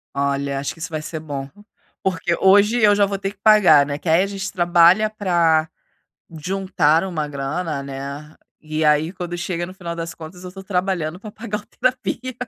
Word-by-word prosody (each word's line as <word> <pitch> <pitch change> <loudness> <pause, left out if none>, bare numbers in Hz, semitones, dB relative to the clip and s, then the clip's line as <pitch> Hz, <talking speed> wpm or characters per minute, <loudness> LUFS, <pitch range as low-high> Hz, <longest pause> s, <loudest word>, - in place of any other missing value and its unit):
Olha, 140 0 -1
acho 140 - -3
que - - -18
isso 165 - -5
vai 155 -2 -4
ser 160 +1 -6
bom. 140 -3 -6 0.5
Porque 175 -2 0
hoje 205 +5 +5
eu 205 -1 +6
já 200 0 +4
vou 200 0 -3
ter 195 0 -3
que 205 - -20
pagar, 185 -10 +6
né? 145 0 -4
Que 160 - -5
aí 165 +3 +4
a - - -2
gente 195 -1 -5
trabalha 175 +3 +4
pra, 170 -6 +1 0.6
juntar 165 -1 +1
uma 165 -6 -3
grana, 145 +2 -3
né? 140 +2 -7 0.2
E 155 0 -3
aí 150 +3 +2
quando 175 -2 -5
chega 175 0 -3
no 185 - -10
final 170 -3 -6
das 165 0 -6
contas 170 +3 -11
eu 180 - -8
tô 190 +1 -10
trabalhando 180 -3 -2
pra 215 +1 -9
pagar 210 -1 -5
a 210 - -17
terapia 255 0 -1
175 Hz, 195 wpm, -21 LUFS, 155-195 Hz, 0.6 s, eu